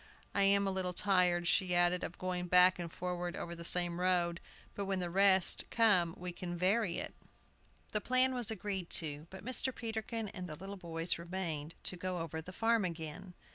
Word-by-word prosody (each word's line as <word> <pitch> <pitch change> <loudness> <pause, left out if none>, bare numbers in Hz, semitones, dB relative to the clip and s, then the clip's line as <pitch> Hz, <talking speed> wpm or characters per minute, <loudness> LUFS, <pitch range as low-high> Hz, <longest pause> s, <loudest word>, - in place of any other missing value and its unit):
"I 200 - +1
am 200 0 +4
a 195 - 0
little 185 -1 -2
tired," 180 -3 +2
she 180 -1 +2
added, 175 +1 +2
"of 175 - -6
going 180 -1 -3
back 180 +1 +5
and 170 -1 -5
forward 180 0 -4
over 170 - -6
the 170 0 -8
same 175 0 +2
road; 175 -2 +1 0.3
but 200 - -4
when 195 0 -2
the 175 -2 -3
rest 190 -1 +6
come 185 -7 +3
we 180 0 -6
can 175 0 -6
vary 185 +1 +1
it." - - -4 0.8
The 210 - -1
plan 255 +2 +1
was 245 -3 -2
agreed 195 -4 -4
to, 150 -1 -1
but 190 +1 -11
Mr. 255 +1 0
Peterkin 225 -1 -4
and 185 -3 -7
the 155 - -5
little 195 +5 -8
boys 170 -2 -2
remained 170 -3 -5
to 180 - +5
go 185 0 -4
over 160 -1 -5
the 180 - -10
farm 225 +2 +1
again. 170 +1 -6
180 Hz, 195 wpm, -33 LUFS, 175-195 Hz, 0.8 s, rest